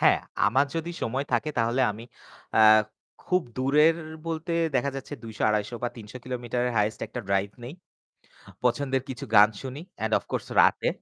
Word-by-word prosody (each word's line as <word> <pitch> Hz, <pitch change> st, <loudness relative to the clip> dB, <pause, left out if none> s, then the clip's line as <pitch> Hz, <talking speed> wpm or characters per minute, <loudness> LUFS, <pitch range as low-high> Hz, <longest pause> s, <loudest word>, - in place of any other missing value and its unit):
হ্যাঁ, -, -, +5 dB, 0.3 s
আমার 130 Hz, +7 st, +3 dB
যদি 165 Hz, +1 st, -3 dB
সময় 130 Hz, +5 st, -1 dB
থাকে 120 Hz, +6 st, +1 dB
তাহলে 120 Hz, +3 st, +1 dB
আমি 110 Hz, +3 st, -8 dB, 0.5 s
আ -, -, +4 dB, 0.7 s
খুব 180 Hz, -1 st, +2 dB
দূরের 150 Hz, +5 st, +4 dB, 0.3 s
বলতে 165 Hz, +1 st, -3 dB, 0.2 s
দেখা 135 Hz, +2 st, +1 dB
যাচ্ছে 135 Hz, +2 st, -6 dB
২০০, 110 Hz, -2 st, -7 dB
২৫০ 105 Hz, +2 st, 0 dB
বা 120 Hz, -, +1 dB
৩০০ 105 Hz, +1 st, -10 dB
কিলোমিটারের 125 Hz, -1 st, -2 dB
হাইয়েস্ট 105 Hz, +1 st, +1 dB
একটা 120 Hz, -, -6 dB
ড্রাইভ 100 Hz, 0 st, +1 dB
নেই। 125 Hz, -, -7 dB, 0.9 s
পছন্দের 130 Hz, +2 st, +1 dB
কিছু 130 Hz, +2 st, -6 dB
গান 105 Hz, +1 st, +8 dB
শুনি, 135 Hz, +1 st, -6 dB, 0.2 s
অ্যান্ড 110 Hz, 0 st, -1 dB
অফ -, -, -8 dB
কোর্স -, -, -3 dB
রাতে। -, -, +3 dB
125 Hz, 165 wpm, -26 LUFS, 110-140 Hz, 0.9 s, গান